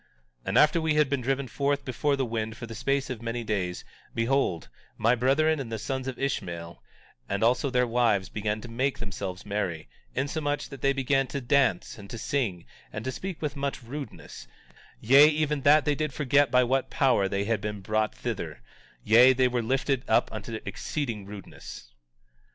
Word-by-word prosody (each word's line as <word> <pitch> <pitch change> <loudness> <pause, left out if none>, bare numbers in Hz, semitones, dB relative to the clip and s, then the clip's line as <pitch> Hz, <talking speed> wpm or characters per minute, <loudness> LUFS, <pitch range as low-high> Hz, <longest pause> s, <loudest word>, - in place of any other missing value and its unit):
18:9 - - -35 0.4
And 95 +5 +1
after 150 +4 +5
we 160 -1 +1
had 150 -2 +3
been 140 -2 0
driven 135 +2 -1
forth 140 +4 -1
before 135 +3 0
the 135 -1 -1
wind 110 -1 -3
for - - -6
the 115 - -8
space 135 +4 -1
of 120 -3 -5
many 115 +1 -3
days, 95 -5 -2 0.3
behold, 115 - 0 0.3
my 115 +2 +3
brethren 140 +6 +2
and 120 -4 -5
the 110 - -2
sons 130 +4 -4
of 130 - -4
Ishmael 85 -11 -4 0.5
and 100 +2 -1
also 125 +4 +2
their 125 -1 +2
wives 115 -5 +2
began 105 +1 -3
to 120 - -8
make 130 +4 -1
themselves 95 -4 -6
merry, 95 -6 -3 0.3
insomuch 145 +2 -2
that 140 -3 -10
they 140 - +3
began 135 0 +1
to 140 - -4
dance, 130 -9 +1
and 100 -1 -11
to 115 - -6
sing, 110 -8 -2 0.3
and 105 - -6
to 130 - -1
speak 185 +5 -6
with 150 -1 -2
much 140 -2 -3
rudeness, 120 - -8 0.5
yea, 135 +6 +7
even 150 -2 0
that 145 +2 +5
they 150 - +2
did 150 -1 -2
forget 145 0 +3
by 125 0 +4
what 130 +2 0
power 130 -8 +2
they 100 +1 -1
had 110 0 -1
been 105 -1 -4
brought 110 +2 0
thither; - - -5 0.4
yea, 120 +4 +7
they 130 0 +3
were 125 -1 0
lifted 135 +2 0
up - - +3
unto - - -5
exceeding 115 -9 -4
rudeness. 95 -11 -10
125 Hz, 190 wpm, -27 LUFS, 110-140 Hz, 0.5 s, yea